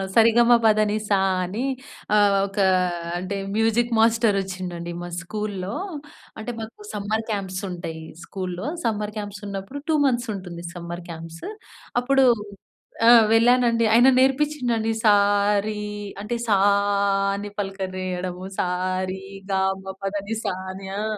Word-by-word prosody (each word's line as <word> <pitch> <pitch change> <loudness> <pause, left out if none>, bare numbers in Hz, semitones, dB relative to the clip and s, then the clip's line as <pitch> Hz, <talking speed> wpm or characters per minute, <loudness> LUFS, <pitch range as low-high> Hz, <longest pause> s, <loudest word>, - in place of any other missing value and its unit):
సరిగమపదనిసా 220 -3 +4 0.3
అని 210 +8 -3 0.5
ఆహ్, 205 -1 +5
ఒక 195 +1 -14 0.6
అంటే 185 +2 -3 0.2
మ్యూజిక్ 225 +2 +2
మాస్టర్ 225 -2 +4
వచ్చిండండి 180 -2 -5
మా 175 - -6
స్కూలులో 200 0 -4 0.7
అంటే 230 +3 -4
మాకు 225 - -9
సమ్మర్ 215 +2 -2
క్యాంప్స్ 190 -3 -3
ఉంటాయి 165 -2 -6 0.2
స్కూలులో 185 +4 -5 0.2
సమ్మర్ 210 -1 -1
క్యాంప్స్ 205 0 -6
ఉన్నప్పుడు 200 +8 -6
2 315 - +4
మంత్స్ 240 -3 +1
ఉంటుంది 175 -3 -8
సమ్మర్ 170 0 -6
క్యాంప్స్. 165 0 -9 0.6
అప్పుడు 270 +1 +4 0.8
ఆ! - - +9 0.2
వెళ్ళానండి 235 0 +4
ఆయన 240 +3 +7
నేర్పించిండండి 260 -4 +1
సా 215 -2 +6 0.5
రీ 210 -1 -3 0.4
అంటే 225 +3 -2
సా 205 -3 +4 0.8
అని 205 +1 -5
పలకరీయడము 185 -2 -4
సా 180 - +1 0.4
రి 190 0 -6 0.3
గా 190 - +2 0.2
మ - - -19 0.2
పదనిసా 205 +2 -2 0.2
అని. 190 0 -9
ఆ! - - -2
205 Hz, 120 wpm, -23 LUFS, 185-230 Hz, 0.8 s, ఆ